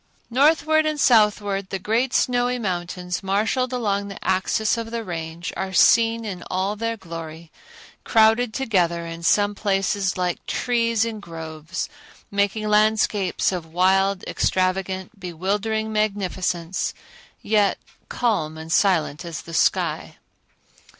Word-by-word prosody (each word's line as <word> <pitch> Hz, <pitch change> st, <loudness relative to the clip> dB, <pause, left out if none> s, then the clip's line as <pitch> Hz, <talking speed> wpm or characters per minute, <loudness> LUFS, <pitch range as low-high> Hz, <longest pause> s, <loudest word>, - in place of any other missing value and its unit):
Northward 310 Hz, +4 st, +3 dB
and 305 Hz, -1 st, -2 dB
southward 210 Hz, -5 st, +3 dB
the 195 Hz, -, -2 dB
great 230 Hz, +7 st, 0 dB
snowy 245 Hz, 0 st, +1 dB
mountains, 180 Hz, -3 st, -3 dB
marshaled 215 Hz, +6 st, 0 dB
along 200 Hz, -5 st, -1 dB
the 195 Hz, -, -8 dB
axis 190 Hz, +3 st, +1 dB
of 230 Hz, -1 st, -5 dB
the 230 Hz, 0 st, -4 dB
Range, 170 Hz, -2 st, -5 dB
are 190 Hz, 0 st, -4 dB
seen 230 Hz, +3 st, +4 dB
in 190 Hz, -4 st, -5 dB
all 190 Hz, +3 st, -1 dB
their 230 Hz, +1 st, -2 dB
glory, 165 Hz, -3 st, -9 dB, 0.5 s
crowded 225 Hz, +1 st, +4 dB
together 180 Hz, -9 st, 0 dB
in 165 Hz, 0 st, -7 dB
some 205 Hz, +4 st, +3 dB
places 195 Hz, -2 st, 0 dB
like 180 Hz, -1 st, -2 dB
trees 230 Hz, -2 st, +1 dB
in 225 Hz, -2 st, -4 dB
groves, 165 Hz, -1 st, -6 dB, 0.4 s
making 205 Hz, +2 st, 0 dB
landscapes 210 Hz, -3 st, +2 dB
of 170 Hz, -3 st, -5 dB
wild, 190 Hz, +2 st, +2 dB
extravagant, 190 Hz, +2 st, -1 dB
bewildering 205 Hz, +5 st, -2 dB
magnificence, 190 Hz, -4 st, -1 dB, 0.5 s
yet 205 Hz, -2 st, +2 dB, 0.3 s
calm 160 Hz, -10 st, -1 dB
and 160 Hz, +1 st, -8 dB
silent 170 Hz, -5 st, +2 dB
as 170 Hz, -3 st, -6 dB
the 165 Hz, -, -10 dB
sky. -, -, +1 dB
200 Hz, 125 wpm, -23 LUFS, 180-220 Hz, 0.5 s, seen